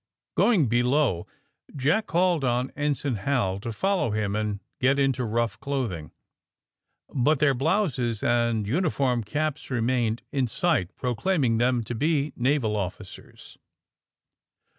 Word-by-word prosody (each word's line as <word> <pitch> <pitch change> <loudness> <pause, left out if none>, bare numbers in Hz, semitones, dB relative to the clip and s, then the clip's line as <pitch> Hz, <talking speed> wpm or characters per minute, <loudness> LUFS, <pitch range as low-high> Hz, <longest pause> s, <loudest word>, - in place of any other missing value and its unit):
Going 205 - +4
below 120 - +1 0.5
Jack 155 +11 +1
called 175 -1 +2
to 125 0 0
Ensign 145 -4 -1
Hal 100 -4 0
to 115 +3 -5
follow 190 - 0
him 105 -1 -1
and 105 -1 -2 0.2
get 135 +2 +3
into 135 -2 +1
rough 115 0 -1
clothing. 115 - -3 1.0
But 145 +3 +3
their 140 0 +3
blouses 135 - 0
and 115 -3 +1
uniform 135 - +1
caps 150 +5 -3
remained 120 -2 0
in 135 -3 0
sight, 130 - 0
proclaiming 125 - 0
them 120 -1 +2
to 120 - -5
be 150 +3 0
naval 125 -4 +1
officers. 95 -1 -7
125 Hz, 120 wpm, -26 LUFS, 115-145 Hz, 1.0 s, Going